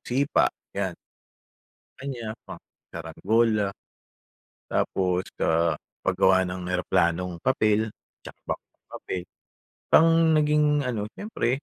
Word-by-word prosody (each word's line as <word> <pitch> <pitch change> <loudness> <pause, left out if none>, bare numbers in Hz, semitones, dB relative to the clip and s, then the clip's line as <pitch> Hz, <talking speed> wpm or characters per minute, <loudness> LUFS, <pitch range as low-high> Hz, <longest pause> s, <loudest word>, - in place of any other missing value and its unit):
sipa, 135 +3 +2 0.2
'yan. - - -2 1.0
Kaniya, 125 -5 -5 0.2
pang, - - -9 0.3
sarangola. 100 +6 +1 1.0
Tapos, 90 -1 0 0.2
ah, 80 0 +2 0.3
paggawa 95 0 +4
ng 90 0 -5
eroplanong 90 -1 0
papel, 110 -4 +2 0.3
tsaka - - -11
bangkang - - -7
papel. 90 - -5 0.7
Ang 165 - +7 0.3
naging 150 0 +3 0.2
ano, 120 -5 -2
siyempre, 205 - -2
100 Hz, 95 wpm, -26 LUFS, 90-120 Hz, 1.0 s, Ang